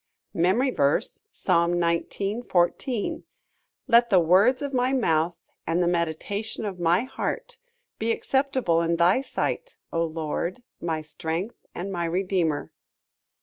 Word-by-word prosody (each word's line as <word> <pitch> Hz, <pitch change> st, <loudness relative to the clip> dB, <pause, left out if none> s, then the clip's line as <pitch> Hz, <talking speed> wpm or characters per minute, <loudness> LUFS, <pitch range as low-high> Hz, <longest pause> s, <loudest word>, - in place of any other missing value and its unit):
MEMORY 200 Hz, +11 st, +2 dB
VERSE, 140 Hz, -, +1 dB
Psalm 170 Hz, -, +2 dB
19: 175 Hz, +6 st, -1 dB
14 205 Hz, +4 st, 0 dB, 0.6 s
"Let 235 Hz, 0 st, +5 dB
the 190 Hz, -4 st, +6 dB
words 200 Hz, -, +4 dB
of 285 Hz, -1 st, -4 dB
my 255 Hz, +1 st, +2 dB
mouth, 170 Hz, -9 st, +2 dB, 0.3 s
and 170 Hz, +2 st, +2 dB
the -, -, +1 dB
meditation 175 Hz, +6 st, -2 dB
of 190 Hz, -3 st, -5 dB
my 175 Hz, +5 st, +3 dB
heart, 470 Hz, -, -4 dB, 0.4 s
be 225 Hz, +1 st, +1 dB
acceptable 260 Hz, -10 st, +1 dB
in 170 Hz, 0 st, +1 dB
thy 175 Hz, +8 st, +4 dB
sight, -, -, -3 dB, 0.2 s
O 165 Hz, -, +2 dB
Lord, 165 Hz, +6 st, -3 dB, 0.2 s
my 160 Hz, -2 st, -1 dB
strength 165 Hz, +7 st, -5 dB
and 190 Hz, +3 st, -4 dB
my 175 Hz, -2 st, -1 dB
redeemer." 175 Hz, -3 st, 0 dB
180 Hz, 130 wpm, -26 LUFS, 170-235 Hz, 0.6 s, the